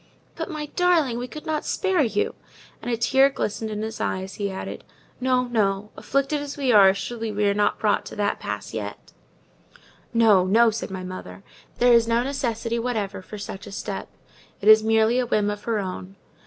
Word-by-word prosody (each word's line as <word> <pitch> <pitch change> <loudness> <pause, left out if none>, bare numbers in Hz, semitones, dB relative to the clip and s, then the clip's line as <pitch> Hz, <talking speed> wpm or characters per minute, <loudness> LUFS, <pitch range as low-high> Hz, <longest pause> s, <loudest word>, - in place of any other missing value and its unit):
"But, - - -4
my 305 -3 -4
darling, 330 -10 +2
we 245 - -4
could 305 +4 -9
not 310 -1 -1
spare 380 -4 +1
you." 220 -6 0 0.5
And - - -5
a 235 - 0
tear 265 +4 +4
glistened 220 -4 -3
in 210 0 -4
his 220 0 -5
eye 185 - -1
as 190 0 -8
he 200 - 0
added—"No, 250 +6 -3
no! 210 -4 0
afflicted 275 +2 -1
as 290 0 -6
we 270 -3 +1
are, 200 -3 +8
surely 225 +2 -4
we 205 0 0
are 200 - +3
not 205 0 +1
brought 210 -2 +1
to - - -9
that 205 -1 -1
pass - - -5
yet." - - -6 1.1
"Oh, 210 -5 +6
no!" 225 +4 +5
said 225 - -4
my 190 -1 -6
mother. 100 - -8 0.3
"There 245 0 +5
is 230 -1 +5
no 230 +1 +2
necessity 235 -4 -2
whatever 220 -5 -2
for 210 +3 -9
such 200 0 -7
a - - -9
step; 195 - -5 0.5
it 205 - -4
is 215 0 +9
merely 225 +2 +3
a 250 - 0
whim 210 -2 +1
of 205 0 -7
her 230 -2 0
own. 190 -1 -5
225 Hz, 195 wpm, -24 LUFS, 205-250 Hz, 1.1 s, is